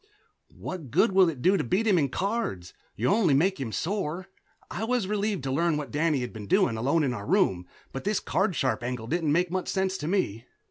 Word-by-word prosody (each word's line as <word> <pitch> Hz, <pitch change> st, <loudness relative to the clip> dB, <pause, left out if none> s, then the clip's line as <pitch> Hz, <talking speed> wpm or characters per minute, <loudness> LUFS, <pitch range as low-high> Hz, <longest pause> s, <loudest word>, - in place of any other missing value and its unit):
"What 170 Hz, -8 st, -6 dB
good 180 Hz, -, +3 dB
will 190 Hz, -2 st, +5 dB
it 140 Hz, -6 st, -6 dB
do 195 Hz, +2 st, +4 dB
to 155 Hz, -, -1 dB
beat 190 Hz, -, 0 dB
him 200 Hz, -5 st, +4 dB
in 140 Hz, -3 st, +1 dB
cards? 195 Hz, -, -3 dB, 0.2 s
You'll 125 Hz, -, +1 dB
only 190 Hz, -10 st, +3 dB
make 185 Hz, +4 st, +2 dB
him 125 Hz, -5 st, -4 dB
sore." 185 Hz, -, -3 dB, 0.4 s
I 195 Hz, -, -4 dB
was 240 Hz, -2 st, 0 dB
relieved 205 Hz, -4 st, -1 dB
to 135 Hz, -, -2 dB
learn 165 Hz, +3 st, +1 dB
what 145 Hz, -6 st, -5 dB
Danny 150 Hz, -2 st, +1 dB
had 125 Hz, -, -5 dB
been 105 Hz, -2 st, -8 dB
doing, 115 Hz, -, +3 dB
alone 140 Hz, +8 st, +1 dB
in 130 Hz, -3 st, 0 dB
our 100 Hz, -4 st, -6 dB
room, 115 Hz, -, +2 dB, 0.2 s
but 135 Hz, -, -6 dB
this 210 Hz, +1 st, 0 dB
card 190 Hz, -2 st, 0 dB
sharp 130 Hz, -4 st, 0 dB
angle 120 Hz, -2 st, -4 dB
didn't 160 Hz, +3 st, 0 dB
make 175 Hz, +3 st, +1 dB
much 185 Hz, 0 st, -2 dB
sense 190 Hz, -1 st, -1 dB
to 150 Hz, -, -4 dB
me. 125 Hz, -, -1 dB
165 Hz, 225 wpm, -27 LUFS, 130-190 Hz, 0.4 s, will